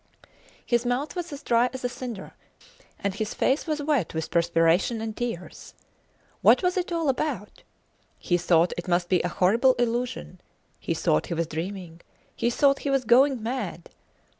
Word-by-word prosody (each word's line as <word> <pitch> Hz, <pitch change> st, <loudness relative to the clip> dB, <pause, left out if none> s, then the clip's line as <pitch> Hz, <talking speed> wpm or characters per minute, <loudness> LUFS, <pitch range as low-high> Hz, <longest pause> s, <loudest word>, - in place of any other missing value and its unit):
His 240 Hz, -1 st, +1 dB
mouth 250 Hz, +7 st, -2 dB
was 350 Hz, -2 st, -4 dB
as 285 Hz, 0 st, -8 dB
dry 240 Hz, +1 st, +3 dB
as 260 Hz, -, -7 dB
a -, -, +2 dB
cinder, 245 Hz, -4 st, -7 dB, 0.6 s
and 200 Hz, -1 st, -2 dB
his 215 Hz, +2 st, -4 dB
face 270 Hz, +6 st, +1 dB
was 305 Hz, -2 st, -1 dB
wet 280 Hz, -, 0 dB
with 160 Hz, -1 st, -3 dB
perspiration 170 Hz, +5 st, +2 dB
and 220 Hz, -1 st, -4 dB
tears. 230 Hz, -8 st, -6 dB, 0.7 s
What -, -, +5 dB
was 360 Hz, 0 st, +1 dB
it 360 Hz, -1 st, -2 dB
all 335 Hz, -2 st, 0 dB
about? 270 Hz, -5 st, -2 dB, 0.6 s
He 175 Hz, -, 0 dB
thought 170 Hz, 0 st, +3 dB
it 175 Hz, -, -7 dB
must 175 Hz, 0 st, +1 dB
be 180 Hz, -2 st, +3 dB
a -, -, -1 dB
horrible 230 Hz, +10 st, +3 dB
illusion; 240 Hz, -, -2 dB, 0.4 s
he -, -, -2 dB
thought 75 Hz, -, +1 dB
he 170 Hz, -, -3 dB
was 165 Hz, +1 st, 0 dB
dreaming; 170 Hz, +1 st, -6 dB, 0.3 s
he 235 Hz, -, 0 dB
thought 275 Hz, +3 st, +3 dB
he 285 Hz, -, -3 dB
was 270 Hz, -2 st, +1 dB
going 255 Hz, +1 st, +4 dB
mad! 250 Hz, +3 st, -4 dB
235 Hz, 170 wpm, -26 LUFS, 175-265 Hz, 0.7 s, What